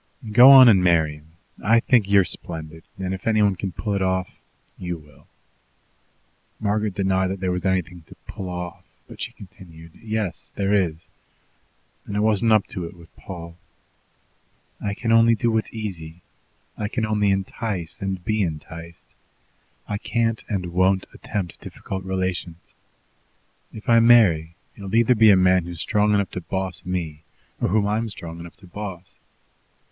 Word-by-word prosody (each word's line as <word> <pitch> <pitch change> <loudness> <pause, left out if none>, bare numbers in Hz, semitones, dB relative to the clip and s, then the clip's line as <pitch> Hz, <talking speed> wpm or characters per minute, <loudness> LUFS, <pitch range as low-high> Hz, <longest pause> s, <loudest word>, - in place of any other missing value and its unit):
"Go 125 +4 +9
on 135 -2 +10
and 95 -5 +6
marry 80 -4 +2
him. 80 +2 -21 0.3
I 115 +3 +5
think 115 -4 +2
you're 100 -1 +6
splendid; 80 -1 -7
and 95 0 -3
if 95 +2 -6
anyone 105 -3 +3
can 95 +1 -4
pull 105 +3 -3
it 100 - -1
off, 95 -1 -1 0.4
you 90 -1 -5
will." 75 -2 -20 1.3
Margaret 105 -1 -1
denied 95 -1 +1
that 95 +1 -4
there 90 -1 -1
was 90 +1 -3
anything 90 -2 -1
to - - -14
"pull 95 -2 -7
off," 90 -1 -6 0.2
but - - -12
she - - -3
continued: 85 -4 -14
"Yes, 110 -5 -4
there 100 0 0
is, 85 -5 0 1.0
and 100 - -3
I - - +1
wasn't 110 +1 +2
up 110 -2 +4
to 90 - -4
it 85 - -9
with 85 -1 -18
Paul. 85 -2 -9 1.3
I 100 -1 -2
can 115 +2 -2
only 115 0 +5
do 115 +2 0
what's 110 -1 -1
easy. 90 -7 -7 0.6
I 105 - -1
can 115 +1 -2
only 105 -1 +1
entice 95 -2 -3
and 95 -2 -4
be 110 -1 0
enticed. 85 0 -6 0.8
I 105 -1 -3
can't, 115 -1 -1
and 90 -4 -3
won't 95 +1 +2
attempt 95 -5 -5
difficult 95 -1 -7
relations. 95 -2 -4 1.0
If 110 - -11
I 115 -1 +6
marry, 95 -9 +5 0.2
it - - -14
will 100 +2 -4
either 115 +2 +5
be 110 -2 +6
a 100 - +8
man 90 -1 +3
who's 85 -2 -8
strong 105 +2 +2
enough 100 -1 0
to 90 - -5
boss 95 0 -4
me 85 -4 -4 0.4
or - - +2
whom 105 +2 +2
I'm 110 +2 -1
strong 85 -4 -8
enough 85 0 -10
to - - -15
boss. 90 -1 -8
95 Hz, 165 wpm, -23 LUFS, 85-105 Hz, 1.3 s, on